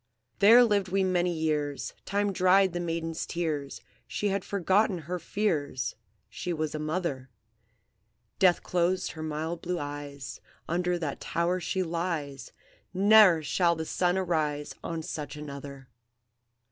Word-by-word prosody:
"There 230 +5 +8
lived 205 -4 +2
we 190 +1 +1
many 180 -1 +1
years; 150 -3 -2
Time 200 0 0
dried 185 0 +4
the 175 - -2
maiden's 165 -1 -3
tears; 150 -5 -3 0.3
She 205 - -1
had 195 0 -1
forgot 200 +2 +2
her 180 -1 -4
fears, 155 - -1 0.3
She 180 - -5
was 155 -2 -2
a 155 - -3
mother; 155 -4 -3 1.1
Death 185 -3 +4
closed 180 +1 0
her 160 - -8
mild 160 +2 -3
blue 180 0 -2
eyes; 145 -2 -6 0.3
Under 175 +1 0
that 155 -5 -4
tower 175 +2 0
she 185 +2 -1
lies; 160 -6 -3 0.4
Ne'er 195 -4 +6
shall 170 +3 +2
the 160 0 -4
sun 180 +3 +1
arise 155 -5 -1
On 165 -1 -4
such 150 -2 -5
another. 140 -2 -8
170 Hz, 135 wpm, -28 LUFS, 150-185 Hz, 1.1 s, There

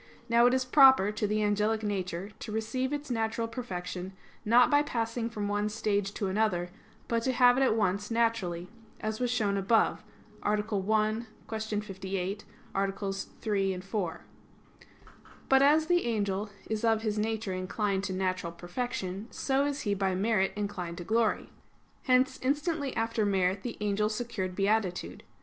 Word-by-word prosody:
Now 235 0 +5
it 245 - +3
is 260 -1 0
proper 265 -6 +6
to 210 0 -1
the 215 +1 0
angelic 210 +1 +1
nature 190 -1 -3
to 220 - -6
receive 220 +5 -2
its 290 -2 -4
natural 230 0 -1
perfection 190 -5 -5 0.3
not 235 +5 +5
by 290 0 +5
passing 230 -4 -2
from 210 -3 -3
one 205 +1 0
stage 205 -2 -1
to 205 - -2
another; 190 -3 0 0.4
but 230 -1 +1
to 260 - +1
have 245 -1 +5
it 265 - +1
at 260 -5 +3
once 205 -1 0
naturally, 225 -7 0 0.3
as 215 0 -3
was 250 -1 0
shown 210 -5 +1
above 215 +4 +2 0.4
(A. 210 - +2
1; 215 +2 0 0.2
Q. 220 -1 -2
58, 195 0 -4 0.3
AA. 195 0 +1 0.5
3, 195 -3 0
4). 185 -2 -4 1.2
But 270 0 +5
as 300 +3 +5
the 350 -2 +2
angel 205 -2 -1 0.2
is 220 0 -3
of 225 -1 +2
his 215 -1 -1
nature 220 -2 -1
inclined 195 +1 -1
to 190 - -3
natural 185 -2 -1
perfection, 190 +2 -4
so 275 +1 0
is 285 0 -2
he 205 - 0
by 195 -1 0
merit 195 0 +2
inclined 195 -5 -4
to 175 - -5
glory. 225 +3 +1 0.5
Hence 260 0 +3
instantly 290 +1 -1
after 225 0 0
merit 195 -1 +1
the 235 - -5
angel 210 0 +1
secured 215 -5 -3
beatitude. 195 -2 0
215 Hz, 160 wpm, -30 LUFS, 195-235 Hz, 1.2 s, proper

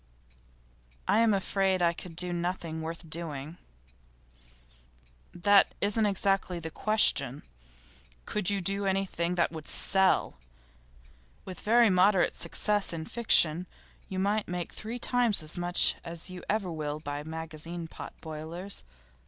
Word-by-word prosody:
'I'm 225 +1 +4
afraid 195 -1 +1
I 170 -1 +3
could 170 0 -10
do 180 +1 -1
nothing 170 -2 -3
worth 165 +1 -6
doing.' 155 -1 -4 1.7
'That 200 +3 +4
isn't 210 +1 +1
exactly 195 -2 0
the 160 -1 -6
question. 150 - +1 0.8
Could 210 -3 -1
you 200 -1 0
do 195 +2 0
anything 190 -3 -1
that 170 -2 +1
would 160 -2 -8
sell? 190 -1 +3 1.1
With 185 -3 -8
very 230 0 +4
moderate 185 0 +4
success 205 +3 -1
in 160 -1 -5
fiction 180 -7 +3 0.4
you 190 - -4
might 205 +3 0
make 175 -1 -4
three 225 +3 -5
times 240 -6 +2
as 155 - -5
much 175 0 +3
as 170 +2 -6
you 180 -1 -8
ever 200 -4 0
will 150 -2 -4
by 145 -1 -5
magazine 160 +1 -6
pot - - -9
boilers. 160 - -4
180 Hz, 130 wpm, -29 LUFS, 160-200 Hz, 1.7 s, I'm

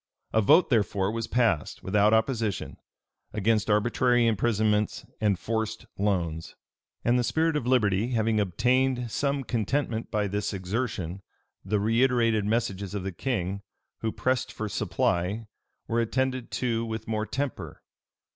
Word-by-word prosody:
A 110 - +4
vote, 155 - +5
therefore, 100 -3 +2
was 115 0 -3
passed, 110 - 0
without 105 +2 +3
opposition, 110 -2 0 0.6
against 110 +1 +1
arbitrary 120 +3 +3
imprisonments 110 -1 +1 0.2
and 105 -3 +2
forced 110 +1 -3
loans.[] 85 -5 -1 0.5
And 120 +1 +4
the - - +1
spirit 160 +6 +1
of 130 -5 -1
liberty 110 -4 +3
having 110 -1 +2
obtained 125 +5 +1
some 140 +4 0
contentment 115 0 -1
by 105 -2 0
this 105 +1 -2
exertion, 95 -2 -3 0.4
the 105 +2 0
reiterated 115 -1 +2
messages 100 -3 -1
of 100 - -3
the 95 - -3
king, 100 -2 -2 0.4
who 110 - -1
pressed 130 0 -1
for 110 - -4
supply, 100 +2 -1 0.4
were 115 +1 +1
attended 130 +1 -1
to 115 -2 -1
with 110 0 -5
more 110 -1 -1
temper. 125 - -4
110 Hz, 135 wpm, -27 LUFS, 100-120 Hz, 0.6 s, vote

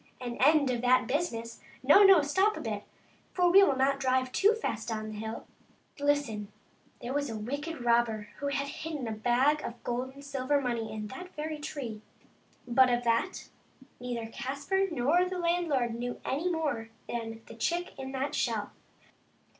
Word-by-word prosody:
An 240 -1 -5
end 285 0 +4
of 240 -2 -2
that 255 +1 +4
business? 235 -6 -2 0.2
No, 295 +10 +7
no; 385 -6 +8
stop 380 +9 +2
a - - -5
bit, 210 -3 -4 0.5
for 355 -1 +3
we 390 +2 +8
will 290 -9 +4
not 275 +1 +2
drive 255 -1 +1
too 415 - +4
fast 225 - -3
down 215 -2 -3
the 210 - -7
hill. 220 +1 -5 0.5
Listen: 280 -8 0 0.5
there 245 +2 -4
was 285 -1 -1
a 225 - -4
wicked 285 +5 -5
robber 235 -3 +2
who 285 - -2
had 280 0 -1
hidden 300 -3 -5
a - - -2
bag 245 +7 +2
of 235 0 -7
gold 255 +2 -3
and 280 0 -12
silver 280 +1 0
money 235 -4 -2
in 215 -1 -5
that 360 +8 -9
very 305 0 -4
tree; 250 -8 -6 0.7
but 255 +1 +5
of 240 0 +1
that 235 +10 0 0.5
neither 240 -2 -4
Caspar 280 +12 -1
nor 320 +4 +2
the 365 0 -4
landlord 335 -9 +1
knew 245 +1 -4
any 305 +7 0
more 285 -9 -2 0.2
than 225 -1 -5
the - - -11
chick 345 +10 -2
in 265 0 -5
the 270 +2 -2
shell. 225 -7 -1
260 Hz, 175 wpm, -30 LUFS, 235-300 Hz, 0.7 s, no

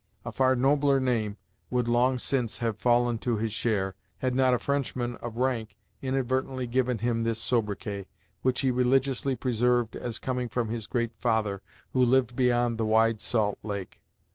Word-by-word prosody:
A - - -4
far 130 0 +3
nobler 140 +2 +3
name 115 -5 0 0.3
would 125 -1 0
long 125 +2 +3
since 125 -2 -1
have 115 -3 -2
fallen 120 -1 +2
to 120 -1 -1
his 110 +1 -1
share, 100 -5 0 0.2
had 130 -1 -1
not 130 0 +3
a 125 - +3
French 140 +2 -1
man 120 -1 -2
of 120 -1 -7
rank 125 -4 -1 0.2
inadvertently 130 0 -1
given 125 0 0
him 115 0 0
this 115 -1 0
sobriquet, 105 -4 -2 0.3
which 130 -1 +1
he 135 -2 +2
religiously 130 +1 +1
preserved 120 -2 +1
as 120 -2 -4
coming 125 -2 -2
from 120 -2 -1
his 115 -2 -4
Great 120 -2 -1
Father 110 -4 0 0.3
who 130 - +4
lived 125 -1 +3
beyond 120 -2 +2
the 110 - +1
Wide 110 0 +3
Salt 105 -4 0
Lake. 100 -3 -6
120 Hz, 170 wpm, -28 LUFS, 115-130 Hz, 0.3 s, who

